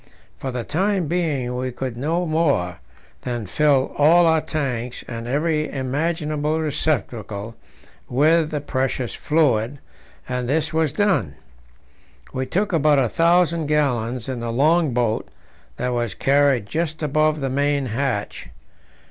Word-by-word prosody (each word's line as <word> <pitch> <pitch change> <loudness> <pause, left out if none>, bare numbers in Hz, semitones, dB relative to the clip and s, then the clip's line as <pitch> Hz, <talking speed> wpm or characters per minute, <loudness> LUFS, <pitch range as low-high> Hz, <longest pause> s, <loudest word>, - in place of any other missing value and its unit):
For 135 - -5
the 125 -1 -3
time 190 - 0
being 145 -7 -1
we 130 +1 -2
could 130 0 -4
do 120 - -10
no 165 +5 0
more 145 - 0 0.4
than 120 -3 -4
fill 140 +5 +2
all 170 +4 +6
our 160 -1 +3
tanks 130 -6 -3
and 115 -1 -6
every 155 +3 0
imaginable 150 +3 -1
receptacle 115 -8 -2 0.5
with 155 +5 +3
the 150 -2 -3
precious 130 -3 -2
fluid, 140 -5 +1 0.5
and 125 -1 -3
this 155 +2 0
was 160 -2 +1
done. 155 - +1 1.0
We 130 0 -2
took 195 +7 -1
about 150 -2 +4
1,000 165 +4 +2
gallons 125 -6 0
in 130 -2 -3
the 115 0 -3
long 155 +5 +3
boat 120 -2 0 0.5
that 125 - -1
was 120 -3 -2
carried 140 -4 +3
just 155 +6 -3
above 155 +1 +2
the 135 -2 -2
main 140 0 +1
hatch. 120 - -3
145 Hz, 135 wpm, -22 LUFS, 125-155 Hz, 1.0 s, all